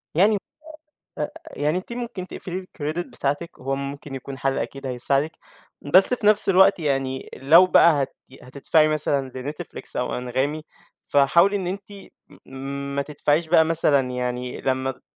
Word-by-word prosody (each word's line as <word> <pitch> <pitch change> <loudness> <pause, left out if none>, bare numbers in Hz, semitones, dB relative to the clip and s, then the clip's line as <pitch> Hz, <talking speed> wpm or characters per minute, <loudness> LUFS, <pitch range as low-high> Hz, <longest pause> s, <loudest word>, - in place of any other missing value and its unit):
يعني 205 +5 +4 0.8
آآ، - - -3
آآ، - - -3 0.3
يعني 150 +4 +1
أنتِ 190 +6 -7
ممكن 235 -7 -6
تقفلي 185 -1 -6
الcredit 155 -2 -5
بتاعتِك، 145 +5 -4
هو 135 +1 -2
ممكن 140 0 -6
يكون 135 +1 -8
حَل 135 +1 -1
أكيد 135 0 -5
هيساعدِك، 135 +5 -1 0.5
بس 185 +10 +8
في 230 -4 0
نفس 210 -1 +3
الوقت 190 0 +5
يعني 135 -3 -2
لو 160 +7 +6
بقى 165 -5 +5
هت - - -8
ي 130 - -15
هتدفعي 145 +4 +1
مثلًا 140 -3 -1
لNetflix 135 +4 -7
أو - - -2
أنغامي، 130 +5 -2 0.4
فحاولي 170 +8 +4
إن 190 -3 -2
أنتِ 195 +2 -6 0.5
م - - -16 0.4
ما 140 - +1
تدفعيش 150 +2 -1
بقى 160 -1 +5
مثلًا 145 -5 +1
يعني 125 0 -4
لمّا 130 0 -1
ت 130 - -18
145 Hz, 160 wpm, -23 LUFS, 135-175 Hz, 0.8 s, بس